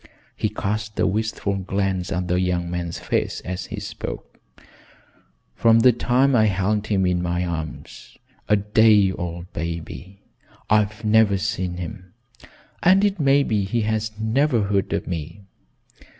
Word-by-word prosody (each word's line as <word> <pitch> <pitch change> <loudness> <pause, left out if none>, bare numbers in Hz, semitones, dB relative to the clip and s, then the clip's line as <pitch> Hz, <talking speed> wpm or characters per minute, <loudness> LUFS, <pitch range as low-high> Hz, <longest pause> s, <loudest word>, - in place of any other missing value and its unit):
He - - -1
cast 105 +1 -3
a - - +3
wistful 100 0 -1
glance 95 -1 -2
at 90 -1 -2
the 90 0 +1
young 90 -1 -1
man's 85 -1 -3
face - - -2
as 95 +1 -5
he - - -6
spoke. - - -7 1.2
"From 115 0 +4
the 125 - +7
time 125 +3 +2
I 110 -2 +5
held 105 +2 0
him 95 -3 +1
in 90 -1 +1
my 90 0 -1
arms, 80 -6 -7 0.3
a 105 - +5
day 105 -1 +4
old 85 -1 -6
baby, 85 +4 -6 0.5
I've 105 +1 +1
never 105 -2 +4
seen 95 -4 -2
him, 90 0 -8 0.7
and 190 +3 +5
it 200 -2 0
may 140 -1 +4
be 105 -6 0
he 115 +5 -1
has 110 0 -1
never 115 +2 +1
heard 100 -1 0
of - - -1
me. 85 +3 -6
100 Hz, 150 wpm, -22 LUFS, 90-110 Hz, 1.2 s, the